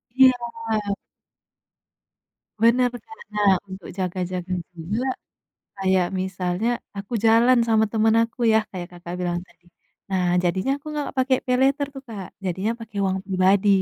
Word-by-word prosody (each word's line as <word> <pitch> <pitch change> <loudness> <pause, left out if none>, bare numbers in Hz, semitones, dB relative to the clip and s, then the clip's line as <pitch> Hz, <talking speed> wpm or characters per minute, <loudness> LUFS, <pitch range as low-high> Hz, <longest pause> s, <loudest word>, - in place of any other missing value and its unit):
Iya. 265 -1 +7 2.2
Benar 235 +3 +4
benar 445 - -11 0.2
nah 205 -2 +4 0.2
untuk 190 -1 -8
jaga-jaga 185 -1 -3 0.2
juga, 195 +9 -3 0.7
kayak 190 -2 +2
misalnya 185 +3 -1 0.3
aku 200 +4 -7
jalan 235 +3 +6
sama 220 -1 +4
temen 220 0 +3
aku 230 +2 -5
ya 220 - +6
kayak 180 -2 -6
Kakak 175 0 -7
bilang 175 -1 -1
tadi 175 - -27 0.5
nah 180 -2 +2
jadinya 185 +9 +1
aku 285 - -18
gak 290 - -2
pake 260 0 +3
Paylater 270 +3 +2
tuh 270 - -8
Kak 200 -5 -6 0.2
jadinya 190 +4 -1
pake 225 -2 -11
uang 190 0 0
pribadi. 190 +1 +3
200 Hz, 135 wpm, -23 LUFS, 185-235 Hz, 2.2 s, Iya